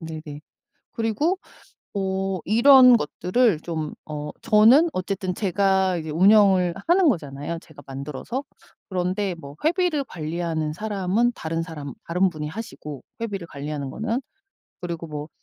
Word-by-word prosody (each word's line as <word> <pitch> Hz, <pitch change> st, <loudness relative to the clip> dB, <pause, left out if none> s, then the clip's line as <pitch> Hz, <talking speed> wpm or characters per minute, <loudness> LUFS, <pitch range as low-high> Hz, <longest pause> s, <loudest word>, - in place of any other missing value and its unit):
네네. 155 Hz, -3 st, -7 dB, 0.5 s
그리고 230 Hz, -, 0 dB, 0.6 s
어 195 Hz, -1 st, -1 dB
이런 250 Hz, +3 st, +7 dB
것들을 185 Hz, +2 st, +1 dB
좀 160 Hz, -3 st, -4 dB
어 150 Hz, -1 st, -5 dB
저는 230 Hz, +9 st, +6 dB
어쨌든 185 Hz, -2 st, -3 dB
제가 190 Hz, -1 st, +1 dB
이제 160 Hz, -2 st, -5 dB
운영을 185 Hz, 0 st, +5 dB
하는 350 Hz, 0 st, +5 dB
거잖아요 150 Hz, -, -2 dB
제가 150 Hz, -3 st, -15 dB
만들어서. 140 Hz, -, -5 dB, 0.5 s
그런데 185 Hz, +1 st, -1 dB
뭐 140 Hz, -4 st, -10 dB
회비를 330 Hz, -3 st, +1 dB
관리하는 160 Hz, -4 st, -3 dB
사람은 210 Hz, +4 st, 0 dB
다른 165 Hz, +1 st, -3 dB
사람 150 Hz, -4 st, -7 dB
다른 180 Hz, +3 st, +2 dB
분이 155 Hz, -3 st, -5 dB
하시고 150 Hz, -, -8 dB, 0.2 s
회비를 200 Hz, -6 st, -4 dB
관리하는 145 Hz, -2 st, -5 dB
거는 230 Hz, -, -2 dB, 0.6 s
그리고 170 Hz, -2 st, -5 dB
뭐 150 Hz, 0 st, -6 dB
180 Hz, 290 characters per minute, -24 LUFS, 155-220 Hz, 0.6 s, 이런